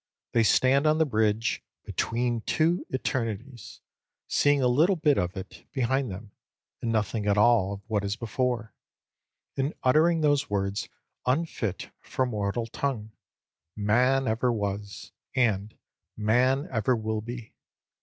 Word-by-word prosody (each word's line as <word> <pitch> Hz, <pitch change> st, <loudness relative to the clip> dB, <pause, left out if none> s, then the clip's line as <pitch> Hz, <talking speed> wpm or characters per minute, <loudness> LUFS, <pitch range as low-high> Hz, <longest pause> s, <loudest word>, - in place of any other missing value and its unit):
They 115 Hz, -, +3 dB
stand 130 Hz, +6 st, +4 dB
on 155 Hz, 0 st, +4 dB
the 160 Hz, -, +3 dB
bridge 110 Hz, -3 st, +1 dB, 0.2 s
"between 120 Hz, 0 st, -1 dB
two 165 Hz, +3 st, +1 dB
eternities," 120 Hz, -3 st, -4 dB, 0.5 s
seeing 145 Hz, 0 st, +3 dB
a -, -, +4 dB
little 155 Hz, +10 st, +4 dB
bit 150 Hz, -4 st, +2 dB
of 90 Hz, +2 st, -2 dB
it 95 Hz, 0 st, -9 dB
behind 130 Hz, -1 st, 0 dB
them, 100 Hz, +2 st, -8 dB, 0.5 s
and 115 Hz, -, -1 dB
nothing 110 Hz, -1 st, -1 dB
at 100 Hz, 0 st, +3 dB
all 105 Hz, -3 st, +4 dB
of 100 Hz, -, -8 dB
what 105 Hz, -3 st, 0 dB
is 100 Hz, +1 st, -1 dB
before; 115 Hz, -2 st, -2 dB, 0.8 s
and 135 Hz, +3 st, -1 dB
uttering 160 Hz, +5 st, +4 dB
those 145 Hz, -2 st, +2 dB
words 100 Hz, 0 st, -1 dB, 0.4 s
unfit 130 Hz, -, -1 dB
for 130 Hz, -, -1 dB
mortal 110 Hz, -1 st, -2 dB
tongue, 115 Hz, -2 st, -3 dB, 0.6 s
"man 125 Hz, +6 st, +2 dB
ever 115 Hz, +3 st, +1 dB
was" 100 Hz, -3 st, -4 dB, 0.2 s
and 110 Hz, -4 st, +1 dB, 0.4 s
"man 125 Hz, +6 st, +2 dB
ever 120 Hz, +1 st, +2 dB
will 110 Hz, -1 st, -2 dB
be." 120 Hz, 0 st, -8 dB
115 Hz, 135 wpm, -27 LUFS, 105-135 Hz, 0.8 s, stand